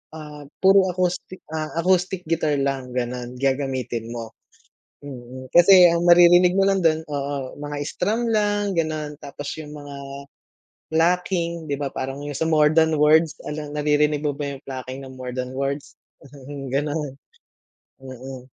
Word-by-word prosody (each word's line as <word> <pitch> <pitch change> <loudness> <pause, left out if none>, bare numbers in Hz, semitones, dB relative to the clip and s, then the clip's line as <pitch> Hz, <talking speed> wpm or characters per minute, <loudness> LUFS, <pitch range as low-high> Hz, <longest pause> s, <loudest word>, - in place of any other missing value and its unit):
ah, 150 -1 -9 0.2
puro 190 0 +6
acoustic 180 0 -2
ah 155 -1 -2
acoustic 185 +1 +1
guitar 160 -2 0
lang 135 -2 -2
ganon 125 0 -3
gagamitin 130 -3 -2
mo. 115 -1 -6 0.7
Mm. 130 -2 -10
kasi 180 +1 +8
ang 170 0 +1
maririnig 175 +1 +7
mo - - +5
lang 195 -1 +2
dun, 160 -1 +3
oo 140 -2 -4
mga 145 0 -5
strum 220 +6 -1
lang 205 -2 +1
ganon 155 -2 -3
tapos 145 0 -8
yung 150 -1 -8
mga, 145 -1 -9 0.9
plucking 170 -1 0
di 140 - -1
ba 140 -1 -4
parang 135 +1 -4
yung 145 - -5
sa 160 +3 -1
more 150 -1 +4
than 160 -1 +3
words 155 +2 +4
alam 150 0 -5
naririnig 150 0 +1
mo 145 - +1
ba 140 -1 -5
yung - - -22
plucking 130 0 -7
ng 130 - -11
more 130 -1 -7
than 125 0 -4
words? 140 +1 -3 0.8
Ganun, 145 0 -1 0.8
mm. 130 -1 -10
150 Hz, 150 wpm, -23 LUFS, 135-170 Hz, 0.9 s, kasi